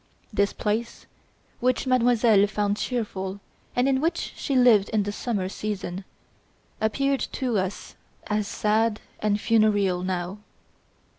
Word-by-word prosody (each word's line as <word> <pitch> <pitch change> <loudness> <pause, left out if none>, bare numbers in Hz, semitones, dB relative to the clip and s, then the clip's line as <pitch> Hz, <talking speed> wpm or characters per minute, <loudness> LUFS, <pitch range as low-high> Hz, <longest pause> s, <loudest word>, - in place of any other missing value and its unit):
This 200 0 +2
place, 220 +3 -3 0.5
which 255 +1 +1
Mademoiselle 235 -5 +4
found 205 0 -1
cheerful 200 -6 -3 0.4
and 245 +2 +2
in 265 -1 +2
which 330 +3 -1
she 275 - -2
lived 240 -6 +5
in 215 -2 +1
the 205 - -3
summer 205 -3 -2
season, 195 -2 -4 0.8
appeared 275 +5 +1
to 245 -6 0
us 190 +1 -4 0.3
as 210 -1 -1
sad 215 +1 +1 0.2
and 210 -1 +1
funereal 205 -5 +2
now. 185 +1 -3
210 Hz, 125 wpm, -25 LUFS, 200-240 Hz, 0.8 s, lived